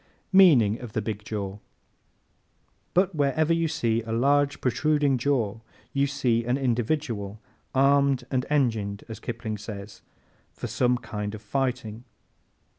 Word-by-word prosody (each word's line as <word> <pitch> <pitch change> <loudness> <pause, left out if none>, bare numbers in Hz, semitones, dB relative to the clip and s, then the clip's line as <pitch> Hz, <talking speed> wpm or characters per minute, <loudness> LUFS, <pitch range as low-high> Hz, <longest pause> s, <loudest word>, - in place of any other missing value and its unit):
Meaning 130 - +6
of 120 -4 -9
the 110 - 0
Big 105 -1 -4
Jaw 100 -2 -4
¶ - - -21 1.4
But 185 +1 +3
wherever 155 +2 +2
you 165 0 +1
see 115 -6 0
a 110 0 -7
large 140 +4 +2
protruding 145 +1 +1
jaw 115 -5 0 0.3
you 140 0 +2
see 125 -5 +1
an 125 +3 0
individual 120 -5 -1 0.4
"armed 140 -1 +4
and 130 -2 +1
engined," 110 -8 0
as 110 -1 -8
Kipling 110 -2 -5
says, 105 -1 -8 0.5
for - - -7
some 125 0 +1
kind 105 -3 -5
of 105 - -10
fighting. 120 -1 -2
120 Hz, 135 wpm, -26 LUFS, 110-140 Hz, 1.4 s, Meaning